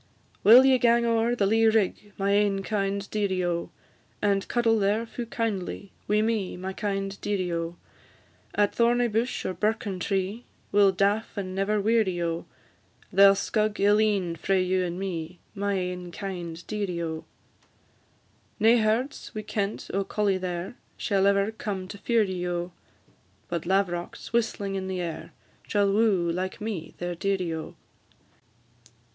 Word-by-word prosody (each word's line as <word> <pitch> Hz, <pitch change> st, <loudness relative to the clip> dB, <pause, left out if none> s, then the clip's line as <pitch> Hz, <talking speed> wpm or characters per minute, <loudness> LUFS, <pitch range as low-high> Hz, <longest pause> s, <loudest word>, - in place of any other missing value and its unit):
Will 245 Hz, +5 st, +9 dB
ye 260 Hz, -1 st, +5 dB
gang 235 Hz, 0 st, +4 dB
o'er 230 Hz, +1 st, +2 dB
the 205 Hz, -, +1 dB
lea 225 Hz, +3 st, +4 dB
rig, 210 Hz, -1 st, +1 dB
My 195 Hz, 0 st, +1 dB
ain 200 Hz, -1 st, +2 dB
kind 200 Hz, -1 st, -1 dB
dearie, 190 Hz, -4 st, 0 dB
O! 170 Hz, -1 st, -2 dB, 0.5 s
And 200 Hz, -1 st, +1 dB
cuddle 230 Hz, -2 st, +2 dB
there 210 Hz, +3 st, +1 dB
fu' 235 Hz, +1 st, -6 dB
kindly 200 Hz, -4 st, -3 dB
Wi' 210 Hz, +1 st, +3 dB
me, 220 Hz, -5 st, -1 dB
my 190 Hz, +1 st, -5 dB
kind 195 Hz, -1 st, -3 dB
dearie, 185 Hz, -4 st, -1 dB
O! 165 Hz, 0 st, -3 dB, 0.8 s
At 205 Hz, -1 st, +2 dB
thorny 240 Hz, +1 st, +3 dB
bush, 230 Hz, +3 st, -1 dB
or -, -, -1 dB
birken 210 Hz, 0 st, -1 dB
tree, 195 Hz, +4 st, -2 dB, 0.3 s
We 205 Hz, -, +4 dB
'll 195 Hz, -1 st, +6 dB
daff 200 Hz, +4 st, 0 dB
and 185 Hz, -2 st, -3 dB
never 195 Hz, +2 st, +1 dB
weary, 210 Hz, -4 st, +2 dB
O! 170 Hz, -1 st, -2 dB, 0.7 s
They 200 Hz, +2 st, +8 dB
'll 195 Hz, -, +6 dB
scug 210 Hz, +1 st, 0 dB
ill 205 Hz, +1 st, +4 dB
een 200 Hz, -6 st, +1 dB
frae 190 Hz, +4 st, +1 dB
you 185 Hz, 0 st, +1 dB
and 175 Hz, 0 st, -3 dB
me, 175 Hz, -3 st, -4 dB
My 200 Hz, -1 st, -1 dB
ain 180 Hz, -1 st, -3 dB
kind 175 Hz, -3 st, -6 dB
dearie, 195 Hz, -5 st, -3 dB
O! 160 Hz, -1 st, -4 dB, 1.3 s
Nae 225 Hz, +2 st, +6 dB
herds 225 Hz, +4 st, -1 dB
wi' 215 Hz, -, -4 dB
kent 205 Hz, -1 st, -3 dB
or 195 Hz, +1 st, +1 dB
colly 200 Hz, -1 st, 0 dB
there, 180 Hz, +4 st, -4 dB, 0.2 s
Shall 195 Hz, -2 st, +2 dB
ever 200 Hz, +1 st, +2 dB
come 200 Hz, -4 st, -4 dB
to 205 Hz, -, -8 dB
fear 230 Hz, 0 st, +2 dB
ye, 185 Hz, -3 st, -3 dB
O! 175 Hz, 0 st, -2 dB, 0.8 s
But 170 Hz, -1 st, -3 dB
lav'rocks, 185 Hz, 0 st, -1 dB
whistling 215 Hz, -4 st, 0 dB
in 190 Hz, -1 st, -3 dB
the 190 Hz, -1 st, -3 dB
air, 170 Hz, -3 st, -5 dB, 0.4 s
Shall 200 Hz, -1 st, +2 dB
woo, 200 Hz, -6 st, +3 dB
like 185 Hz, +4 st, -3 dB
me, 210 Hz, -7 st, -5 dB
their 175 Hz, 0 st, -3 dB
dearie, 185 Hz, -1 st, -1 dB
O! 160 Hz, -1 st, -6 dB
200 Hz, 160 wpm, -27 LUFS, 185-215 Hz, 1.3 s, Will